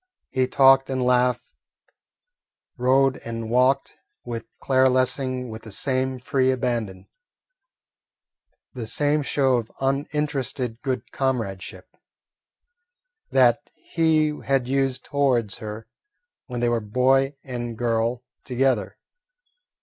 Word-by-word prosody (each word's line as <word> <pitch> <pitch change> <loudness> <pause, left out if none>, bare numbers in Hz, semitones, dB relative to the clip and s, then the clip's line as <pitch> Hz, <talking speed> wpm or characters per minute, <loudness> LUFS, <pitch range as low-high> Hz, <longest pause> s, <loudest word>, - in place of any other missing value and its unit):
He 130 -1 +1
talked 135 0 +5
and 130 -1 -1
laughed, 125 0 +2 1.3
rode 130 +2 +3
and 115 -1 -6
walked, 130 +2 +2 0.3
with 115 -2 -5
Claire 130 -1 +3
Lessing 130 -1 0
with 110 0 -8
the 110 - -11
same 130 +4 -1
free 130 +1 +1
abandon, 120 -7 -2 1.7
the 120 -4 -6
same 145 +4 +1
show 135 -2 +2
of 115 -1 -5
uninterested 135 -3 -2
good 130 -2 -3
comradeship, 115 -9 -3 1.3
that 130 +1 +3
he 155 -2 +1
had 135 -3 +1
used 135 -1 0
towards 130 -8 0
her 110 +1 -7 0.6
when 125 -2 -4
they 120 - +2
were 120 -1 0
boy 130 +6 +2
and 120 -3 -5
girl 115 +1 0 0.2
together. 125 -5 0
130 Hz, 105 wpm, -24 LUFS, 120-135 Hz, 1.7 s, talked